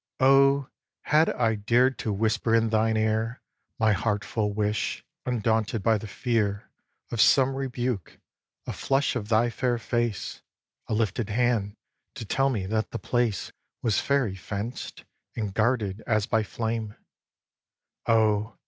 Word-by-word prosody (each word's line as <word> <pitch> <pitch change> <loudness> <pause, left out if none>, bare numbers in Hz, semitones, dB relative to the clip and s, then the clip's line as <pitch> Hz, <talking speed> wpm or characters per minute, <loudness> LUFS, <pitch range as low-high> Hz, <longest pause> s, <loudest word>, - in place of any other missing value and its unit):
xvi. 130 - +3
Oh! 135 0 +5 0.4
had 155 +2 +3
I 115 -3 +1
dared 120 +5 +2
to 110 - -2
whisper 110 +2 +1
in 115 0 +3
thine 110 0 +2
ear 110 +2 0 0.4
My 110 -1 +3
heart 105 0 -1
full 105 -2 -1
wish, 105 0 -2 0.2
undaunted 110 -3 0
by 110 -1 +3
the 110 - -7
fear 105 -1 -1 0.4
Of 115 - +1
some 135 +4 +5
rebuke: 125 - -3 0.5
a - - -4
flush 135 0 0
of 110 -4 -4
thy 115 +1 +3
fair 125 -1 0
face, 120 -2 -2 0.5
A 110 - -1
lifted 110 0 -1
hand 110 -3 +1 0.4
to 115 - -6
tell 135 +6 +1
me 105 -8 -2
that 110 +2 -1
the - - -4
place 120 -5 -1 0.3
Was 110 -3 +2
fairy 140 -8 +1
fenced, 100 +5 -6 0.3
and 105 -4 -3
guarded 110 -2 0
as 110 -3 +2
by 110 -1 +1
flame, 110 0 -3 1.1
Oh! 110 -1 +2
110 Hz, 145 wpm, -26 LUFS, 105-120 Hz, 1.1 s, Oh